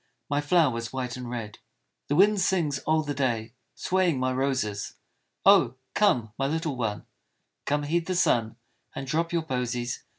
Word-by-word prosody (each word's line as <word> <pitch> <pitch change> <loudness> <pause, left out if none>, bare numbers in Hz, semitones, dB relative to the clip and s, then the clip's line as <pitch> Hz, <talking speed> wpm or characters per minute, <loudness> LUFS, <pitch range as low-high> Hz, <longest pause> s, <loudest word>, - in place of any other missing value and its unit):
My 145 0 +2
flowers 145 -8 +2
white 125 -2 -3
and 125 -1 -7
red." 115 -4 -6 0.5
The 145 - 0
wind 205 +3 +5
sings 170 -7 +1
all 155 0 +3
the 145 -1 -3
day 120 -5 -1 0.2
Swaying 180 -6 +1
my 130 0 0
roses, 130 -6 -1 0.2
" - - -45
Oh 200 0 +9
1 120 -2 -6 0.2
come, 125 - +2
my 135 - +1
little 160 -1 -2
one 110 -4 -2
I - - -31 0.6
Come, 145 0 +1
heed 165 +3 0
the 185 - -1
sun 115 -11 +2 0.4
And 135 - -4
drop 165 +5 -1
your 170 -2 0
posies 125 -4 -3
135 Hz, 175 wpm, -27 LUFS, 120-165 Hz, 0.6 s, Oh